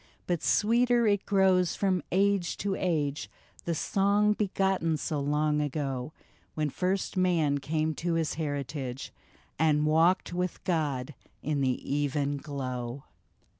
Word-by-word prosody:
" - - -38
But 175 -3 -1
sweeter 240 +2 +3
it 205 -2 +1
grows 190 -3 +3
from 190 -3 +1
age 195 -1 +1
to 200 -1 -1
age, 150 -6 -1 0.4
The 170 - -1
song 200 +5 +2
begotten 190 -5 0
so 150 0 -2
long 150 +1 +1
ago, 135 -2 -3 0.4
When 150 -2 -1
first 190 +5 -1
man 165 -6 +2
came 155 +3 -1
to 170 0 -1
his 165 -2 0
heritage, 140 -4 -4 0.5
And 150 -1 +3
walked 165 +4 +3
with 180 0 -3
God 150 -6 -1 0.3
in 145 -1 -1
the 130 -2 +1
even 145 0 0
glow. 130 -3 -5
160 Hz, 130 wpm, -29 LUFS, 145-185 Hz, 0.5 s, sweeter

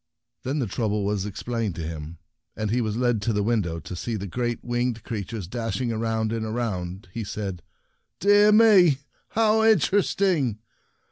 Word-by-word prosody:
When 135 +4 -2
the 135 - 0
trouble 105 -1 -1
was 100 -1 -1
ex 100 +1 -7
plained 115 -6 -2
to 85 - -5
him, 80 0 -7 0.4
and 110 -1 -2
he 125 +2 +2
was 110 -1 -2
led 120 -3 +1
to 115 +2 0
the 105 0 +1
window 100 -7 0
to 90 - -7
see 115 +6 -3
the 100 -2 -4
great 120 +4 -3
winged 120 -2 -1
creatures 105 -3 -5
dashing 120 +3 -2
around 110 0 -1
and 115 -1 -2
around, 100 -5 -3
he 115 - -3
said, 100 -3 -5 0.3
" - - -49
Dear 205 +1 +6
me! 205 -9 +6 0.3
How 220 0 +3
interesting 190 - +2
115 Hz, 175 wpm, -25 LUFS, 100-125 Hz, 0.4 s, Dear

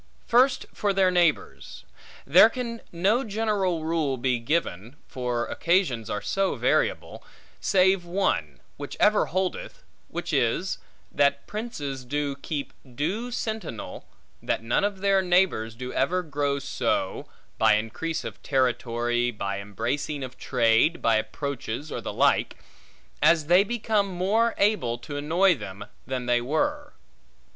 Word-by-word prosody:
First 255 +3 +3
for 205 -1 0
their 190 -1 +3
neighbors; 160 - 0 0.4
there 180 +10 +7
can 235 -1 -5
no 200 +9 +2
general 205 -6 -1
rule 160 -5 0
be 125 -1 0
given 115 - -2
(for 125 -2 -2
occasions 165 - 0
are 105 - -3
so 195 -1 0
variable), - - 0 0.4
save 190 -1 +3
one, 185 +3 -1 0.2
which - - -7
ever 210 0 +4
holdeth, 185 +2 -3 0.2
which - - -5
is, - - 0 0.3
that 140 0 +2
princes 145 - -5
do 145 +2 -2
keep 140 0 -5 0.2
due 195 - -2
sentinel, 220 - -5 0.3
that - - -2
none 115 +10 +1
of 200 -2 -1
their 195 -1 +3
neighbors 180 - +1
do 125 +2 -6
ever 180 +7 +1
grow 145 -3 -1
so 140 - -2 0.3
(by - - +5
increase 155 +10 -3
of - - -8
territory, 120 -2 0
by 100 -3 -4
embracing 120 +8 -3
of 130 -1 -7
trade, 115 +9 +2
by 115 -1 +3
approaches, 140 +3 -4
or - - -4
the - - -4
like), - - +2 0.6
as 165 -3 +4
they 175 +5 +5
become 215 -2 0
more 200 +6 +1
able 200 - +1
to 145 +4 -8
annoy 170 +6 +3
them, 100 - -8 0.2
than 130 -1 -3
they 120 0 +2
were. 290 - -1
155 Hz, 135 wpm, -26 LUFS, 125-195 Hz, 0.6 s, there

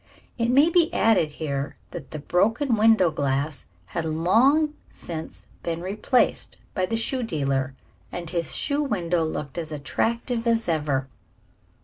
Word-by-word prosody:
It 230 0 +1
may 285 +7 +5
be 335 -2 +4
added 185 -9 +3
here, 140 -3 -3 0.2
that 165 -7 -8
the - - -6
broken 225 - +1
window 215 -5 +5
glass 140 0 -1 0.2
had 95 - -4
long 230 - +3 0.2
since 160 -2 -7 0.2
been 170 0 -3
replaced 210 +7 0 0.2
by 185 -1 0
the 225 - -1
shoe 255 +3 0
dealer, 135 - -1 0.4
and 175 -1 -5
his 170 -1 -1
show 285 0 +1
window 175 - 0
looked 150 -1 -4
as 160 -2 -5
attractive 230 - -1
as 230 -1 +2
ever. 150 -5 0
175 Hz, 140 wpm, -25 LUFS, 155-230 Hz, 0.4 s, may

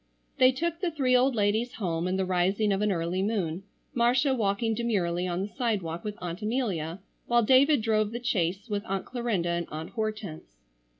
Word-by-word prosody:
They 255 0 +7
took 335 +5 -2
the 360 - +1
three 270 -6 +2
old 255 +1 +3
ladies 215 +3 +1
home 175 -5 -2
in 185 +1 0
the 190 - 0
rising 190 +3 +1
of 195 - -1
an 210 -1 +2
early 175 +1 -1
moon, 190 -5 -1 0.3
Marcia 250 +2 +3
walking 225 -1 0
demurely 185 -6 0
on 180 +1 -1
the - - -3
sidewalk 200 -9 -2
with 210 -1 -4
Aunt 175 +2 -5
Amelia, 200 -7 -2 0.3
while 240 0 +4
David 265 +2 +5
drove 215 -1 +1
the 240 +1 -6
chaise 190 -3 0
with 205 -2 -2
Aunt 195 -1 -2
Clarinda 235 -9 -1
and 170 -1 -1
Aunt 155 +2 -6
Hortense. 215 - -5
210 Hz, 185 wpm, -28 LUFS, 180-240 Hz, 0.3 s, They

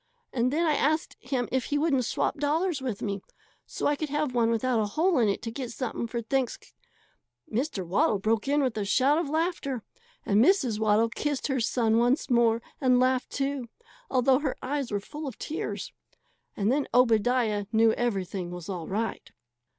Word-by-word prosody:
And 250 0 +1
then 330 +4 +1
I 310 - +3
asked 310 +4 0
him 250 -1 -2
if 260 -2 0
he 290 - -1
wouldn't 290 -5 +2
swap - - -1
dollars 305 +2 0
with 245 -6 -4
me, 200 -2 -2 0.5
so - - -4
I 290 - +3
could 305 +1 -4
have 295 -2 -1
one 235 -2 +2
without 230 +1 +1
a 215 - +1
hole 325 - +2
in 225 -3 +3
it 200 - -2
to 230 - -4
get 250 +1 -5
something 235 -1 -3
for 235 0 -4
Thanks 260 +1 0 0.5
" 120 - -27
Mr. 230 -5 -1
Waddle 195 +4 +2
broke 215 +4 0
in 290 +1 +2
with 255 -3 0
a - - 0
shout 265 +10 +3
of 330 -4 -2
laughter, 310 - -1 0.4
and 210 +2 +4
Mrs. 265 - +3
Waddle 220 +1 +3
kissed 290 +4 -2
her 265 -1 +1
son 230 -1 +2
once 245 +3 +1
more, 235 -1 +3 0.2
and 255 -2 +4
laughed, 255 0 +2
too, 275 -3 -2 0.4
although 260 +1 +3
her 285 -3 -2
eyes 275 -1 -3
were 205 - 0
full 295 +9 -7
of 265 - -7
tears. 315 - -4 0.6
And 210 +2 +1
then 280 +1 +1
Obadiah 230 -3 +3
knew 225 0 +5
everything 195 -6 -2
was 175 0 -8
all 175 -4 -4
right. 220 +3 -3
250 Hz, 190 wpm, -27 LUFS, 220-280 Hz, 0.6 s, knew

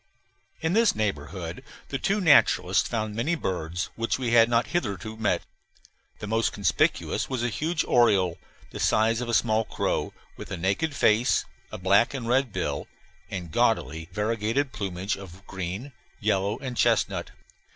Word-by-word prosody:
In 160 +2 0
this 230 +1 +4
neighborhood 85 -4 -3 0.3
the 135 - -3
two 200 +2 +1
naturalists 165 -7 +4
found 110 -2 -2
many 125 +10 0
birds 90 - -3
which 115 0 -1
we 125 -3 -2
had 115 -1 +6
not 120 0 +2
hitherto 110 - -2
met. 110 -2 0 0.7
The - - -7
most 115 +2 +1
conspicuous 100 - 0
was 130 -3 -2
a 120 - +1
huge 155 +7 -1
oriole, 95 -8 +3 0.3
the - - -7
size 115 +2 +2
of 120 - -4
a - - -1
small 110 +2 +2
crow, - - -2 0.3
with - - -9
a - - -4
naked 100 - 0
face, 115 -1 +3 0.3
a - - -5
black 100 +8 +3
and 120 -4 -4
red 130 0 +2
bill, - - -3 0.4
and 90 -3 -5
gaudily 80 -7 0
variegated 115 +7 -1
plumage 95 -1 -3
of 95 0 -12
green, 95 +8 -5 0.3
yellow, 100 0 0
and 130 -3 -6
chestnut. - - +1
110 Hz, 155 wpm, -26 LUFS, 95-125 Hz, 0.7 s, had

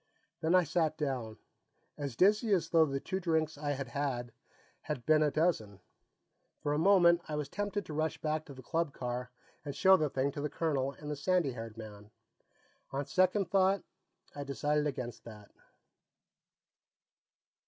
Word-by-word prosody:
Then 160 +3 +3
I 180 - +6
sat 160 -1 0
down, 130 -7 -3 0.6
as 140 -4 -5
dizzy 210 - +3
as 170 -3 +1
though 165 -2 +5
the 135 -1 -2
two 190 +7 -3
drinks 160 -3 0
I 145 0 -2
had 135 -2 -5
had, 125 -3 -2 0.5
had 135 -6 -5
been 155 -1 +5
a 150 - +4
dozen. 140 - 0 0.8
For 145 - -1
a 150 - +1
moment, 175 -2 +5
I 150 - -3
was 150 -2 -2
tempted 205 +1 -3
to 155 - -7
rush 155 +1 -1
back 155 0 -1
to 140 - -11
the 130 - -11
club 160 +3 -1
car 125 0 -4 0.3
and 145 -2 -5
show 190 0 +6
the 155 -3 0
thing 135 +1 0
to 145 - -5
the 150 - -2
colonel 140 -5 -1
and 150 0 -7
the - - -2
sandy 165 0 +1
haired 115 -2 -8
man. 105 -2 -10 0.8
On 140 +1 -3
second 185 +2 +2
thought, 195 0 +3 0.5
I 145 - -5
decided 150 +2 0
against 125 -5 -5
that. 105 -3 -12
150 Hz, 170 wpm, -32 LUFS, 135-170 Hz, 0.8 s, I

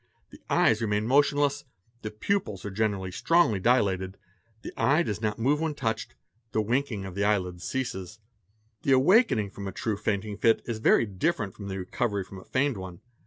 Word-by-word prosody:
The - - -15
eyes 110 0 +3
remain 105 -1 0
motionless, 145 +2 +2 0.4
the 110 - -4
pupils 105 - -2
are 100 - -4
generally 100 -2 -1
strongly 165 - +2
dilated, 95 -4 +1 0.5
the - - -7
eye 150 +5 +3
does 105 -5 -4
not 105 -2 -1
move 140 +6 +1
when 160 -2 -1
touched, 110 -5 -3 0.4
the 110 - +2
winking 115 -2 -1
of 95 - -7
the 100 +2 -1
eyelid 90 -4 0
ceases.: 110 -5 -4 0.6
The 135 - +2
awakening 130 - +4
from 100 -1 -7
a - - -4
true 110 0 -2
fainting 105 0 -2
fit 115 +1 +3
is 115 -2 -4
very 115 - +4
different. 105 - -1
from 100 - -9
the 95 -1 -4
recovery 100 +2 -2
from 95 +1 -11
a - - -13
feigned 135 -2 0
one. 95 -2 -8
110 Hz, 180 wpm, -27 LUFS, 100-130 Hz, 0.6 s, awakening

